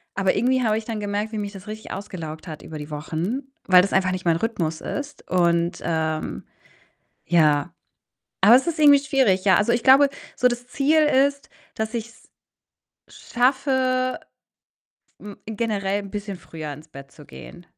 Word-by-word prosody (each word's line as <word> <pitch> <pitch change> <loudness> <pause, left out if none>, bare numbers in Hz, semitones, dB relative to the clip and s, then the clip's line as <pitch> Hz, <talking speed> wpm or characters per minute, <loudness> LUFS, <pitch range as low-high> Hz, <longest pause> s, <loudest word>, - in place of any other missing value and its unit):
aber 195 -1 +1
irgendwie 255 +4 +2
habe 220 -2 +1
ich 220 - -5
dann 225 -2 -4
gemerkt, 205 +2 -3
wie 215 - -4
mich 205 0 -5
das 195 +1 -11
richtig 215 +1 -8
ausgelaugt 165 -5 -7
hat 155 -2 -8
über 155 - -9
die 150 +1 -8
Wochen, 170 - -4 0.2
weil 185 -1 +7
das 200 - -2
einfach 185 -1 +2
nicht 185 -1 -5
mein 165 -1 +3
Rhythmus 170 -7 -2
ist 290 0 -6
und, 170 -1 +1
ähm, 160 -1 -2 0.8
ja, 155 0 +2 0.7
aber 235 - +8
es 265 +5 +2
ist 330 -1 -1
irgendwie 290 -2 +7
schwierig, 260 -9 +1
ja. 190 - +6
Also, 210 +3 +2
ich 235 0 +1
glaube, 275 +1 +6 0.3
so 250 - +3
das 245 0 -4
Ziel 290 +4 +2
ist, 280 -1 +2 0.2
dass 220 +1 -4
ich's 230 +1 -8 0.8
schaffe, 255 0 0 1.0
hm, 205 -1 -10
generell 205 -3 -2
'n 195 - -10
bisschen 205 -2 -5
früher 155 -4 -8
ins 155 +3 -12
Bett 140 -2 -13
zu 150 - -15
gehen. 175 +4 -12
205 Hz, 170 wpm, -23 LUFS, 175-255 Hz, 1.0 s, aber